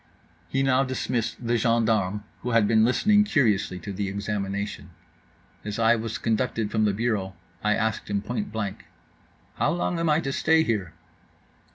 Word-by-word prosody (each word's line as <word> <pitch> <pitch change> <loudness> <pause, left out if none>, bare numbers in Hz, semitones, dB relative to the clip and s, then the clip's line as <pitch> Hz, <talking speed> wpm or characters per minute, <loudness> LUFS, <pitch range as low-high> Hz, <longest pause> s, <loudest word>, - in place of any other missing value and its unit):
He 135 0 +1
now 135 0 +3
dismissed 120 -2 -2
the 120 +1 +2
gendarmes, 110 -4 +1 0.2
who 125 - -3
had 115 -3 +3
been 110 0 +4
listening 205 - +4
curiously 110 - +1
to 100 +3 -6
the 100 0 -2
examination. 100 0 -3 0.7
As 105 0 -4
I 115 0 +4
was 115 -1 -3
conducted 115 -1 -1
from 110 -1 +2
the 105 - +3
bureau 100 -3 -1 0.3
I 105 0 +3
asked 110 -2 -2
him 100 -1 -1
point 110 -1 -3
blank: 105 -3 -4 0.7
"How - - +2
long 175 0 -1
am 165 -1 +1
I 150 +1 +4
to 135 -3 -3
stay 160 +2 +3
here?" 105 - -2
110 Hz, 165 wpm, -25 LUFS, 105-125 Hz, 0.7 s, been